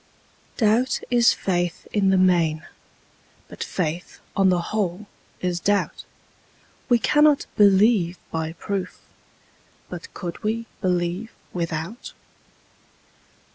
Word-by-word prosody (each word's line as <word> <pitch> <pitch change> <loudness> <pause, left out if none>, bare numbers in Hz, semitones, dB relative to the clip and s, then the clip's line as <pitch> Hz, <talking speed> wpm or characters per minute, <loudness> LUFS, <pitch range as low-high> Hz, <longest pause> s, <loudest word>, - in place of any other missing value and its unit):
Doubt 230 +3 +2
is 240 -1 +5
faith 175 -2 -2
in 200 -2 +3
the 190 - +4
main: 170 -4 +2 0.8
but - - -6
faith, 170 0 -3 0.2
on 195 -1 +4
the 180 -1 +3
whole, 205 -1 -1 0.4
is 180 -1 -1
doubt: 205 +3 0 0.8
We 240 - +6
cannot 295 +4 +4
believe 200 -3 +4
by 160 0 -2
proof: 190 +1 -4 0.9
but 460 - -8
could 170 -2 -6
we 225 +2 -1 0.2
believe 180 +3 -1 0.2
without? 170 +5 -4
190 Hz, 100 wpm, -23 LUFS, 175-215 Hz, 0.9 s, We